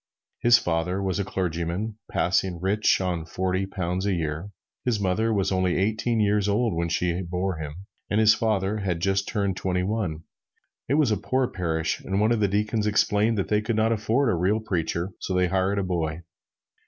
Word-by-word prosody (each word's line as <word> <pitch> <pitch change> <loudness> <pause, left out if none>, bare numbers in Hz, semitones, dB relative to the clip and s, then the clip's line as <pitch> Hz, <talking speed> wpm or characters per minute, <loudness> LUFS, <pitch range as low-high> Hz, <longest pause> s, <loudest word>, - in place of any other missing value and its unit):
His 120 -1 +6
father 90 -1 -1
was 95 -1 -1
a - - +1
clergyman, 95 +3 -3
passing 90 -1 0
rich 100 +4 +2
on 90 -3 -1
forty 95 +3 -1
pounds 95 0 -2
a 100 - +2
year. 80 +3 -3 0.3
His 120 -4 0
mother 100 +4 +1
was 100 -3 +1
only 95 -1 +1
eighteen 110 +4 0
years 105 -1 +2
old 110 +1 +1
when 85 0 -1
she 90 +1 0
bore 90 +1 -2
him, 75 -2 -6 0.3
and 105 - +2
his 110 0 +6
father 105 -2 0
had 95 -5 -2
just 95 +2 0
turned 100 -3 -1
twenty 90 -1 -1
one. 95 -6 -2 0.7
It 140 - +3
was 145 -6 +3
a 105 - +2
poor 130 +6 0
parish, 80 -3 -1
and 95 +1 -1
one 110 +2 +3
of 115 - +2
the 105 - +3
deacons 105 +2 0
explained 105 +1 +2
that 95 - -1
they 105 0 +2
could 110 +1 -1
not 110 +1 +2
afford 115 +4 +1
a - - +2
real 95 +5 +1
preacher; 90 -3 -2
so 95 - -3
they 90 -1 +2
hired 95 +2 +1
a 100 - +1
boy. 85 -3 -2
95 Hz, 195 wpm, -25 LUFS, 90-105 Hz, 0.7 s, His